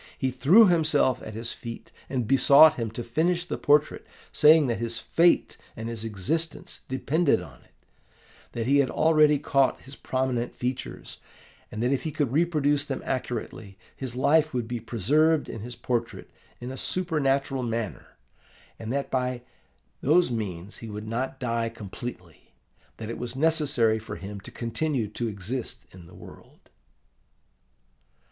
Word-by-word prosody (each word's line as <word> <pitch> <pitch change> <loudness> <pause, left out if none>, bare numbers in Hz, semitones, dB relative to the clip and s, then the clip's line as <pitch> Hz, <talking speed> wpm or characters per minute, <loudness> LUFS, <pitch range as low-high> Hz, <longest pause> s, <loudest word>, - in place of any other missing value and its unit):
He 130 -1 -1
threw 145 - +6
himself 155 - +2
at 110 - -8
his 115 +1 -4
feet, 115 -1 -9 0.2
and 125 -5 -2
besought 140 +4 +7
him 115 -5 -3
to 115 +2 -6
finish 170 +9 0
the - - -3
portrait, 150 +1 +2 0.3
saying 155 0 +6
that 120 -4 -1
his 115 0 -3
fate 170 +7 +2 0.2
and 110 0 -6
his 115 -2 -4
existence 115 - -3
depended 140 - +1
on 75 -9 -12
it; - - -28 0.8
that 115 -1 -3
he 140 +3 +3
had 140 -2 +3
already 155 -2 +4
caught 135 -2 +1
his 135 +1 -12
prominent 130 -3 -2
features; 125 +1 -5 0.5
that 110 - -4
if 135 - +1
he 160 - -3
could 145 -5 -1
reproduce 145 -2 +2
them 140 -2 -5
accurately, 115 -5 -4 0.2
his 130 -3 -5
life 150 +2 +3
would 120 -2 -1
be 120 0 -3
preserved 145 - +2
in 115 - -7
his 120 +2 -8
portrait 120 -2 -3 0.3
in 125 +1 -6
a 130 - -7
supernatural 140 -7 0
manner; 115 -4 -4 0.6
that 130 +5 -3
by 125 -1 -1 0.6
that 160 +1 +3
means 100 -4 -5
he 115 - -9
would 105 +1 -7
not 130 +4 -3
die 115 -3 -1
completely; 100 - -9 0.4
that 110 0 -6
it 115 - -6
was 125 0 -5
necessary 135 -7 +2
for 110 - -8
him 100 +1 -7
to 95 - -11
continue 120 +1 -2
to 115 +3 -4
exist 110 +4 -5
in 90 -2 -14
the 90 - -15
world. - - -15
125 Hz, 155 wpm, -26 LUFS, 115-145 Hz, 0.8 s, besought